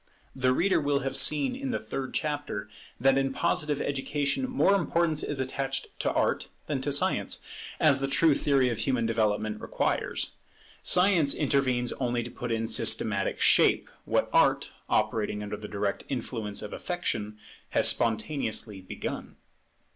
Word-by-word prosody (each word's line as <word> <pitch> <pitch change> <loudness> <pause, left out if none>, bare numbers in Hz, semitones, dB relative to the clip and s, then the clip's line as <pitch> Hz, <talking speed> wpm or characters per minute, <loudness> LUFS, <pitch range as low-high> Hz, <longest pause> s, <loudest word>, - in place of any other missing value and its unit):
The 130 -1 +2
reader 175 +7 +2
will 145 -1 +1
have 135 +1 -2
seen 145 - +3
in 270 0 -4
the 250 - 0
third 135 -1 -5
chapter 145 -9 -3 0.3
that 135 +1 +4
in 135 0 0
Positive 150 -1 0
education 140 - -1
more 255 -6 +3
importance 170 -4 +1
is 145 - -3
attached 135 +1 -3
to - - 0
Art - - 0 0.2
than 140 -4 -2
to 145 +2 -1
Science, 140 - +1 0.4
as 140 -3 +5
the 135 - 0
true 145 +3 +4
theory 135 -2 +2
of 115 - -3
human 125 -4 0
development 110 -1 0
requires. - - -2 0.5
Science 180 -5 +3
intervenes 130 -4 +1
only 120 -2 0
to - - -7
put 120 -1 -5
into 115 0 0
systematic 110 -3 +2
shape - - +4
what - - +1
Art, - - +3 0.2
operating 105 -1 0
under 105 0 -4
the 105 0 -8
direct 100 -1 -2
influence 115 -5 -3
of 105 - -7
affection, 105 - -3 0.3
has - - +3
spontaneously 110 -3 0
begun. 95 - -6
135 Hz, 150 wpm, -28 LUFS, 110-145 Hz, 0.5 s, as